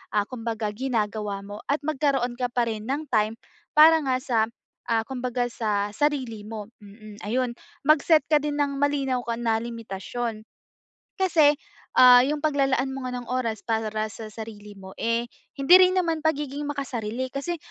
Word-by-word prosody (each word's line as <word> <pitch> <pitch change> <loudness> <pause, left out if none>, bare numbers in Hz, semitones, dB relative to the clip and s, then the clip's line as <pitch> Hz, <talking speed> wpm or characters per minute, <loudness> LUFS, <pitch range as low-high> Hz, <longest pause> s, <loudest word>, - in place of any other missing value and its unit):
ah, 205 -1 +2
kumbaga 230 -3 -4
ginagawa 215 -5 -2
mo 205 +1 -9
at 285 +2 +1
magkaroon 275 -5 0
ka 250 -1 -2
pa 240 -1 +1
rin 220 -2 -4
ng 290 +4 -2
time 215 -1 +1 0.4
para 320 +2 +8
nga 260 -2 +1
sa, 255 -4 0 0.5
ah, 225 -1 +3
kumbaga 250 -1 -2
sa 210 -3 -1
sarili 260 -7 -1
mo, 215 -1 -7 0.2
mm, 210 +1 -13
ayun. 245 +3 0 0.3
Mag-set 305 -1 +5
ka 305 - +5
din 295 0 -2
ng 285 -1 0
malinaw 275 -3 0 0.2
na 230 -2 +1
limitasyon, 230 0 -5 0.8
kasi, 315 -6 +4 0.4
ah, 250 -1 +9
'yung 295 +4 0
paglalaan 270 -3 +1
mo 270 -1 -6
nga 255 - -3
ng 245 - -11
oras 240 -4 -2
para 220 -1 0 0.2
sa 220 0 -8
sarili 210 -1 -9
mo, 190 0 -11
eh, 230 +1 0 0.3
hindi 275 +6 +6
rin 370 0 +4
naman 330 -3 0
pagiging 295 -2 -1
makasarili. 255 -4 -3
Kasi, 340 +5 -3
250 Hz, 160 wpm, -25 LUFS, 220-285 Hz, 0.8 s, ah